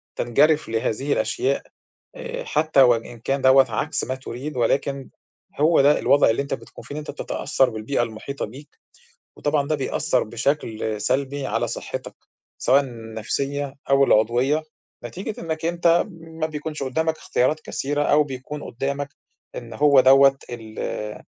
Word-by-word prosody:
تنجرف 150 +6 +2
لهذه 115 +5 -1
الأشياء. 135 +5 0 0.5
آآ - - -6
حتى 155 -2 +2
وإن 120 -2 +2
كان 135 +4 -1
دوّة 130 0 +6
عكس 150 +8 -1
ما 130 - -2
تُريد، 130 +2 -7
ولكن 135 +3 0 0.5
هو 160 +1 +5
ده 145 +2 +4
الوضع 140 - +4
اللي 115 +4 +1
أنت 140 - -4
بتكون - - -9
فيه 145 - -8
إن 150 - -3
أنت 150 - -6
بتتأثّر 135 -2 0
بالبيئة 115 +3 -1
المحيطة 120 +5 -5
بيك، 140 +7 -14 0.6
وطبعًا 145 -1 0
ده 155 - +1
بيأثّر 130 -2 0
بشكل 110 -2 -2
سلبي 140 +4 -1
على - - -1
صحتك - - -6 0.4
سواءً 135 +3 +4
النفسية 135 +4 -4 0.2
أو 140 0 +6
العضوية 125 +7 +2 0.4
نتيجة 185 - -6
إنك 160 -1 -4
أنت 170 0 +3
ما 165 -1 -5
بيكونش 150 -1 -5
قُدامك 160 +5 0
اختيارات 150 +5 0
كثيرة 145 0 -2
أو 150 0 +4
بيكون 140 +2 -7
قُدامك 140 +3 -3 0.5
إن 115 -2 -8
هو 140 +2 +5
دوّة 135 +1 +6
ال 110 -2 -6
140 Hz, 145 wpm, -23 LUFS, 120-150 Hz, 0.6 s, دوّة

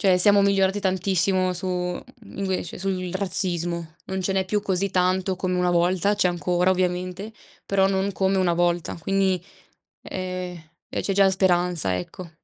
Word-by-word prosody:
Cioè, 190 -3 +4
siamo 200 +2 +6
migliorati 195 0 +2
tantissimo 185 -1 +1
su 180 +1 -5
mhmm, 180 +7 -5
invece, 190 -4 -3
sul 185 -2 -3
razzismo. 175 -3 0
Non 190 0 -3
ce 190 +1 -1
n'è 190 0 0
più 205 +2 -1
così 195 0 -1
tanto 185 +1 +1
come 180 0 -2
una 180 0 +1
volta, 180 +4 +2
c'è - - +2
ancora 180 +1 +1
ovviamente, 185 +3 -2 0.3
però 195 -1 +2
non 195 +1 0
come 195 0 0
una 180 -2 +2
volta. 175 0 0
Quindi, 190 +1 0 0.6
ehm, 185 -2 -5 0.3
eh, - - -2
c'è 195 - -1
già 195 0 +5
speranza, 175 - +2
ecco. 165 - -8
185 Hz, 160 wpm, -24 LUFS, 180-195 Hz, 0.6 s, siamo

